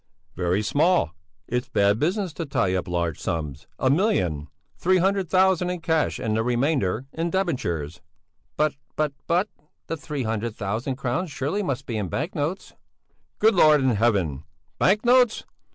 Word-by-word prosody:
"Very 90 +3 0
small! 150 - +2 0.4
It's 125 +2 -2
bad 100 -3 +2
business 180 - 0
to 165 - -4
tie 95 -9 +1
up 95 0 -1
large 85 -3 -1
sums. 70 -4 -4
A 130 - +2
million! 115 - +1 0.3
Three 185 +1 +2
hundred 190 -1 +1
thousand 185 -1 +3
in 180 -1 -3
cash 160 -2 0
and 110 -1 -1
the 110 - +2
remainder 125 - 0
in 165 +1 -1
debentures." 90 - -2 0.6
"But 155 -1 +2 0.2
but 150 -2 0
but! 180 +5 +2 0.4
The 165 - -3
three 145 -1 -4
hundred 110 0 -2
thousand 110 +6 -2
crowns 140 +7 -2
surely 145 +7 -2
must 140 -10 -3
be 115 - -3
in 100 - -2
bank 165 - -3
notes!" 160 +4 -3 0.6
"Good 220 +2 +4
Lord 155 -5 +6
in 130 -1 +2
Heaven! 100 - +1 0.4
Bank 210 +5 +3
notes? 245 -2 +4
135 Hz, 160 wpm, -24 LUFS, -, 0.6 s, Lord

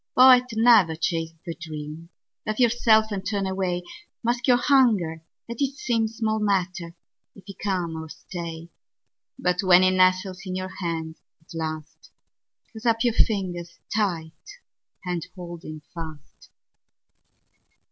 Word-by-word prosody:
Poet, 255 -1 +8
never 220 -8 +5
chase 165 0 -2
the 170 - -4
dream. 160 0 -8 0.4
Laugh 215 +2 -2
yourself, 225 -2 +4
and 195 -2 -3
turn 200 0 -1
away. 190 -2 -1 0.4
Mask 240 +2 0
your 245 -1 +6
hunger; 220 - +3 0.3
let 235 +2 -6
it 275 0 0
seemSmall 225 -4 -1
matter 180 -4 -1 0.4
if 195 - -15
he 195 - -8
come 180 -4 -2
or 160 0 -7
stay; 170 -1 -7 0.7
But 180 0 0
when 185 -1 +6
he 185 - +5
nestles 185 0 +2
in 185 -2 -5
your 185 0 -5
hand 165 -3 -4 0.2
at 160 +2 -16
last, 155 -1 -6 0.6
Close 225 +1 -6
up 225 0 +3
your 240 -2 +2
fingers 175 -6 0 0.2
tight 195 - -3 0.5
and 175 -2 -2
hold 175 -2 -8
him 155 -1 -8
fast. 160 -4 -10
185 Hz, 135 wpm, -25 LUFS, 165-220 Hz, 0.7 s, Poet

